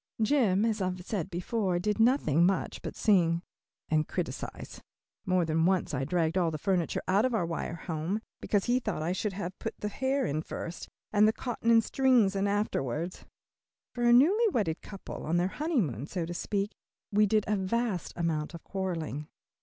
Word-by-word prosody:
Jim, 220 -4 +3
as 220 -2 0
I - - +1
have 180 -1 -5
said 195 -4 -2
before, 185 +1 -1
did 210 +4 -1
nothing 225 - +4
much 190 +1 +1
but - - -6
sing 170 -5 +3 0.4
and 155 -1 +1
criticise. - - -5 0.5
More 185 -2 +3
than 160 +1 +2
once 185 -4 +1
I 135 -1 -1
dragged 165 +3 +1
all 170 -2 +2
the 155 - -3
furniture 180 0 0
out 195 +3 +3
of 255 -2 +1
our 190 -6 +1
wire 165 0 -3
home, 165 +4 -3 0.2
because 205 -2 0
he 245 +1 +2
thought 215 -10 -3
I 170 - 0
should 195 +2 -2
have 185 -1 -5
put - - -4
the 210 - -2
hair 265 +5 0
in 150 +2 -1
first, 170 +1 -6 0.2
and 210 0 +6
the - - +5
cotton 230 0 -3
and 230 -1 +6
strings 245 -6 +3
in 195 +1 +1
afterward. 175 - -1 0.7
For 245 - -3
a 240 - +6
newly 360 - +6
wedded 205 - 0
couple, 195 -2 -8
on 165 +3 0
their 175 +2 +2
honeymoon 190 - -1
so 175 -2 -3
to 175 - -5
speak, 200 +3 -2 0.4
we 210 +1 +4
did 215 0 +2
a 210 - +2
vast 200 0 -1
amount 165 -2 -1
of 165 - -10
quarreling. 165 -6 -3
190 Hz, 190 wpm, -29 LUFS, 170-220 Hz, 0.7 s, and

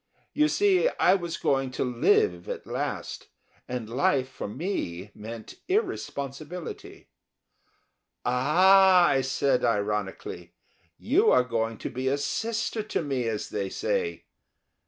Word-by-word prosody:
You 300 0 +3
see, 400 +6 +3
I - - +5
was 170 -3 -2
going 135 -1 +1
to - - -1
live 115 -8 +2
at - - -5
last, - - -4 0.4
and 125 -3 -4
life 130 +2 +1
for 130 - -7
me 105 - -4
meant 110 +1 -9
irresponsibility. 170 - -4 1.2
"Ah!" 180 +8 +5
I 135 - +2
said, 135 0 +1
ironically, 105 -3 -2 0.4
"you 375 - +3
are - - +5
going 115 -2 -2
to - - -5
be 130 +1 -3
a 135 +2 +2
sister 225 - -2
to 210 -5 -3
me, 135 -5 -2
as 110 -2 -3
they 100 -2 -3
say." 470 - -2
135 Hz, 125 wpm, -27 LUFS, 115-195 Hz, 1.2 s, I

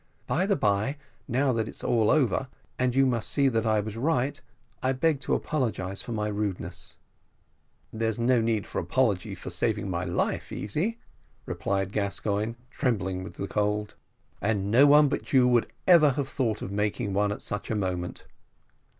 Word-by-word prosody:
By 185 +5 0
the 200 - +3
bye, 110 +4 +1 0.3
now 130 +1 +2
that 110 -1 -1
it's - - -8
all 115 -3 +2
over, 135 -3 +2 0.3
and 125 -1 +1
you 135 0 +5
must 120 -4 +1
see 140 -2 +3
that 115 -2 0
I 110 -1 +3
was 105 +1 -6
right, 140 +2 0 0.4
I 130 +1 +1
beg 145 +2 +1
to 135 - 0
apologise 105 -10 -2
for - - -8
my 105 -2 -1
rudeness." 105 -3 -4 1.0
"There 110 0 0
needs 105 - -5 0.6
no - - 0
apology 100 +2 0
for - - -8
saving - - -1
my - - -1
life, - - -1
Easy," 170 - -2 0.5
replied 95 -1 -2
Gascoigne, 105 +2 -1 0.2
trembling 95 -9 -1
with 95 - -9
the 100 - -4
cold; 105 0 -1 0.5
"and 100 -1 0
no 135 +6 +7
one 145 +1 +7
but 140 - -4
you 130 -2 +6
would 120 -2 +2
ever 170 -5 +7
have 135 0 -2
thought 115 -8 -1
of 95 - -5
making 105 +1 -1
one 100 +1 +2
at 105 - -5
such 105 0 -4
a 110 - 0
moment." 90 -3 -3
110 Hz, 170 wpm, -27 LUFS, 105-135 Hz, 1.0 s, no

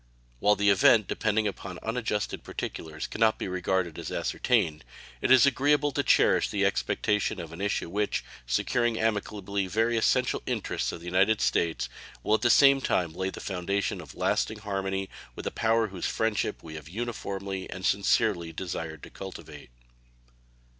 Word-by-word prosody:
While 105 +7 +4
the 100 0 +3
event 110 0 +5
depending 110 0 0
upon 95 -2 -6
unadjusted 115 -2 -2
particulars 80 -1 -5
can - - -7
not 110 -1 +4
be - - -4
regarded 90 -2 -1
as - - -6
ascertained, 90 -11 0 0.4
it - - 0
is 130 +1 +8
agreeable 145 +2 +2
to - - 0
cherish - - +3
the - - +1
expectation 105 -1 0
of 80 -1 -7
an 85 - -8
issue 100 -3 -1
which, 105 +4 -1 0.2
securing 120 - +1
amicably 100 -3 -1
very 115 +4 +1
essential 115 - +2
interests - - -2
of 85 - -8
the - - -11
United 95 +5 +3
States, 80 -7 +1 0.4
will 105 - +1
at 110 - +3
the 120 - +3
same 140 +1 +6
time 85 -9 0
lay 95 +2 -2
the - - -8
foundation 95 +1 -2
of - - -12
lasting 110 - 0
harmony 95 -2 -3 0.3
with - - -8
a - - -1
power 115 -1 +1
whose 95 -2 -3
friendship 110 -2 -1
we 80 - -9
have 80 +1 -9
uniformly 100 -3 -4
and 95 0 -6
sincerely 100 -4 +2
desired 80 -4 -5
to - - -10
cultivate. 95 -9 -9
100 Hz, 165 wpm, -28 LUFS, 90-110 Hz, 0.4 s, is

